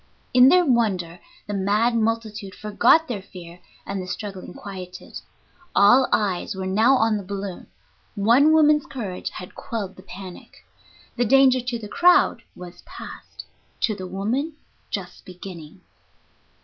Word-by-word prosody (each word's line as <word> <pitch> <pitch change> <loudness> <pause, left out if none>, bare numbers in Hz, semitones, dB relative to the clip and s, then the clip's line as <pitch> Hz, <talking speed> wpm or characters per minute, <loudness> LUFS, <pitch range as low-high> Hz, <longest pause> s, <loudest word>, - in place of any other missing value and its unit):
In 250 +1 +7
their 360 +2 +5
wonder 195 - 0 0.3
the 210 - -5
mad 205 +5 +1
multitude 220 -3 -2
forgot 235 +10 +3
their 220 -7 -4
fear, 180 -2 -12 0.3
and 200 -1 -4
the 185 - -8
struggling 190 0 -6
quieted. 185 -2 -9 0.5
All 245 +6 +5
eyes 200 -1 0
were 190 0 -4
now 220 +8 +3
on 225 -3 +2
the 205 - -6
balloon; 195 -1 -6 0.5
one 235 +9 +4
woman's 300 -2 +4
courage 205 -9 -5
had 180 - -10
quelled 215 -7 -6
the - - -12
panic. 185 -1 -12 0.5
The 245 - +2
danger 260 +1 +5
to 245 0 -3
the 220 -2 -8
crowd 355 +11 +4
was 175 -1 -11
past, - - -11 0.4
to 220 - +1
the 185 -2 -7
woman 230 - -2 0.4
just 180 -3 -6
beginning. 180 -2 -11
205 Hz, 140 wpm, -23 LUFS, 185-245 Hz, 0.5 s, In